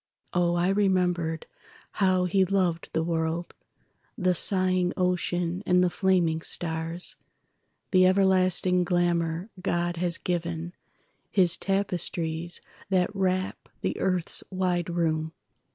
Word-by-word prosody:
Oh, 175 -1 +2
I 175 +1 +2
remembered 180 -5 +1 0.5
how 185 -2 +2
he 190 +2 +3
loved 185 -3 0
the 160 - 0
world, 165 +1 -2 0.6
The 185 0 +2
sighing 185 -1 +1
ocean 180 -1 0
and 180 -2 +3
the 180 - +1
flaming 175 -5 +1
stars, 165 +1 -1 0.7
The 185 -1 +6
everlasting 185 -1 +3
glamour 175 +1 0
God 175 -2 -1
has 175 0 0
given—His 175 +2 -2
tapestries 175 -4 -2 0.3
that 190 +1 +1
wrap 185 -1 -1
the - - -1
earth's 185 -3 0
wide 180 -2 -1
room. 160 -2 -1
180 Hz, 105 wpm, -27 LUFS, 170-185 Hz, 0.7 s, The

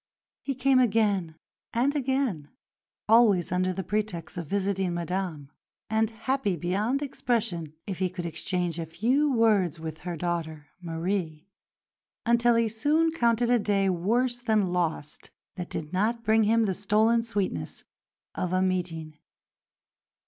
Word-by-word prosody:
He 275 - -3
came 265 +1 +3
again 205 -8 +2 0.4
and 265 +5 +1
again 260 - -1 0.6
always 215 -7 +5
under 185 0 +1
the 190 +1 -4
pretext 205 -4 -3
of 170 -4 -5
visiting 190 -1 -1
Madame, 170 -4 -3 0.4
and 220 0 +2
happy 225 -2 -1
beyond 205 - -1
expression 220 - -2
if 190 -4 -5
he 185 -1 +1
could 175 -1 -6
exchange 170 +1 -2
a 165 - -4
few 250 - +1
words 210 - +2
with 160 -1 -6
her 175 -1 -5
daughter, 160 -3 -3
Marie; 165 -1 -3 0.8
until 235 0 +4
he 230 0 +3
soon 295 +9 +2
counted 235 -5 +2
a 245 - +4
day 200 -2 +1
worse 240 +8 0
than 215 -6 +1
lost 165 -4 -2 0.2
that 180 -2 -6
did 155 +1 -5
not 225 +5 0
bring 220 0 +3
him 225 +2 +3
the 195 -3 +1
stolen 215 +4 +2
sweetness 200 - -3 0.5
of 180 0 -2
a 185 - +3
meeting. 165 -4 -2
195 Hz, 140 wpm, -27 LUFS, 175-230 Hz, 0.8 s, always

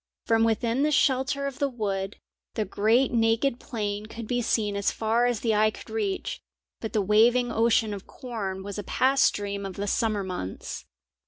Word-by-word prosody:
From 225 0 +3
within 230 +3 +1
the 300 - +3
shelter 280 -1 +2
of 275 -2 -5
the 280 - +1
wood, 200 -5 -3 0.4
the 215 - 0
great 220 +7 +2
naked 230 +2 +2
plain 210 -3 -4
could 230 +1 -7
be 245 +1 0
seen 215 -3 0
as 200 0 +1
far 230 +2 +1
as 240 -3 -1
the 225 -2 +1
eye 215 +1 +4
could 215 - -11
reach, 405 -4 -2 0.4
but 220 - -5
the 215 -3 +2
waving 235 +4 +4
ocean 225 -2 +2
of 195 -1 -8
corn 200 -7 -5
was 200 +1 -5
a - - -4
past 270 +6 +3
dream 200 -1 -4
of 195 -2 -6
the 200 - -3
summer 215 -1 0
months. 180 - -5
225 Hz, 185 wpm, -26 LUFS, 205-245 Hz, 0.4 s, eye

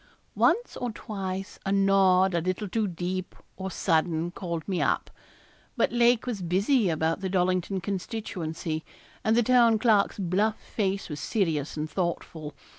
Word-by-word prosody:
Once 480 +2 +2
or 245 - -2
twice 195 -3 -5
a 195 - -1
nod 195 -1 +4
a 170 - +1
little 185 +4 -2
too 215 +2 0
deep 180 +1 -4 0.2
or 190 0 -4
sudden 165 -2 0
called 170 -3 -5
me 190 -3 0
up. - - 0 0.7
But - - +2
Lake 240 0 +3
was 235 -6 -3
busy 195 +6 +2
about 160 +2 0
the 190 - -2
Dollington 185 0 0
constituency, 175 -6 -4 0.4
and 220 +1 +3
the 240 - +5
Town 235 -2 +5
Clerk's 215 -3 +3
bluff 200 +3 0
face 195 -2 -2
was 150 -2 -6
serious 160 -9 -1
and 155 +1 -2
thoughtful. 160 -3 -3
190 Hz, 150 wpm, -27 LUFS, 170-210 Hz, 0.7 s, the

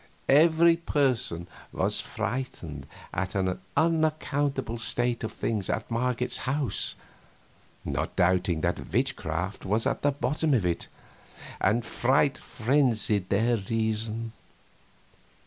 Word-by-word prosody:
Every 165 +3 +6
person 130 - 0 0.3
was - - 0
frightened 85 - -5 0.3
at 95 - -2
the 95 -2 0 0.2
unaccountable 145 -6 +1
state 120 +1 0
of 110 - -3
things 105 -5 -2
at 110 - -2
Marget's 125 +1 0
house, 135 +1 +1 0.9
not - - -2
doubting 90 -2 +2
that - - -2
witchcraft 95 -6 -1
was 105 +4 0
at - - 0
the 145 - +3
bottom 145 +2 0
of 105 -7 +1
it, 85 -1 -1 0.7
and 115 +4 +2
fright 135 +4 +2
frenzied 115 -6 +1
their 115 +4 +2
reason. 110 +2 -1
115 Hz, 110 wpm, -27 LUFS, 100-140 Hz, 0.9 s, Every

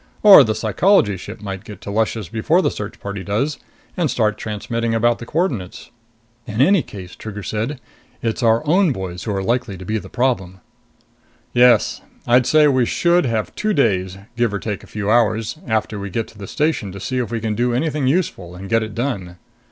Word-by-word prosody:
Or 200 -8 +10
the 110 -3 -1
Psychology 110 - +3
ship 105 +5 -9
might 95 -2 -6
get 105 -3 -10
to 100 - -6
Luscious 110 -1 -1
before 155 - +1
the - - +1
search 105 0 -7
party 100 -1 -5
does 135 +10 -1 0.4
and 170 -4 0
start 110 -4 +1
transmitting 115 +2 -3
about 120 +1 +2
the 115 - -8
coordinates." 125 - -2 0.6
"In 110 0 -4
any 180 +7 +5
case," 95 -7 -10
said - - -15
Trigger, 110 - -4 0.5
"it's 115 +2 -1
our 115 +3 +3
own 175 0 +3
boys 90 -4 -6
who 110 - -2
are 95 -1 -2
likely 120 -2 -1
to 95 - -9
be 110 +3 -1
the - - -11
problem." 95 -8 -1 0.9
"Yes. 125 0 +4 0.2
I'd 125 +1 +4
say 155 -1 +5
we 130 -4 +2
should 175 -3 +2
have 110 -2 -2
two 215 0 -1
days, 95 -7 +1 0.2
give 120 -2 +1
or 100 - -2
take 105 -1 -5
a - - -14
few 105 -1 -2
hours, 115 +4 +1
after 110 -2 -1
we 100 0 -5
get 115 +4 -2
to 110 - -17
the 100 - -7
station 150 -10 -1
to 100 - -8
see 130 +6 -2
if 120 - -2
we 115 0 -2
can 110 -1 -2
do 120 +3 0
anything 150 0 0
useful 130 - -1
and 95 +2 -9
get 115 0 +3
it 110 -1 -5
done. 100 -9 -3
115 Hz, 205 wpm, -20 LUFS, 100-130 Hz, 0.9 s, Or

